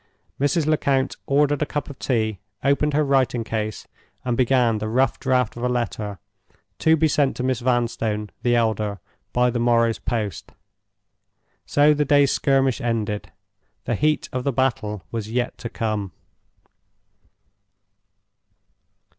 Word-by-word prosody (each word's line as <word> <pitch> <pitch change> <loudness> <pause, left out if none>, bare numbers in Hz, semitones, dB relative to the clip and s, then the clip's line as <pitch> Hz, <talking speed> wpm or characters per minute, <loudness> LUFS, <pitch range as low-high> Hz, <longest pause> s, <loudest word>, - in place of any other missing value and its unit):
Mrs. 145 +3 +1
Lecount 140 -3 +1
ordered 145 +1 +2
a - - +2
cup 145 -1 -3
of 140 - -10
tea, 110 -5 0 0.2
opened 140 +2 +2
her 155 - +3
writing 135 -4 +1
case, 110 -1 -4 0.4
and 120 -1 0
began 120 -3 +2
the 110 - -3
rough 130 +4 +1
draft 125 -3 +1
of 120 - -7
a 125 - +1
letter 115 -4 -2 0.6
to 160 0 +4
be 160 +1 +3
sent 140 -2 +1
to 125 - -2
Miss 130 -2 0
Vanstone, 115 -4 -1
the 120 -1 +2
elder, 110 -3 0 0.3
by 125 0 +2
the 120 - -2
morrow's 115 -1 +2
post. 105 -7 -4 1.1
So 145 +1 +5
the 150 0 +1
day's 145 -1 +4
skirmish 135 -3 +2
ended. 110 -3 -2 0.5
The - - -1
heat 150 0 +1
of 130 0 -2
the 140 - +1
battle 115 -7 -1
was 110 -2 -4
yet 120 +2 -1
to 120 -2 -5
come. 105 -6 -3
125 Hz, 140 wpm, -23 LUFS, 110-140 Hz, 1.1 s, So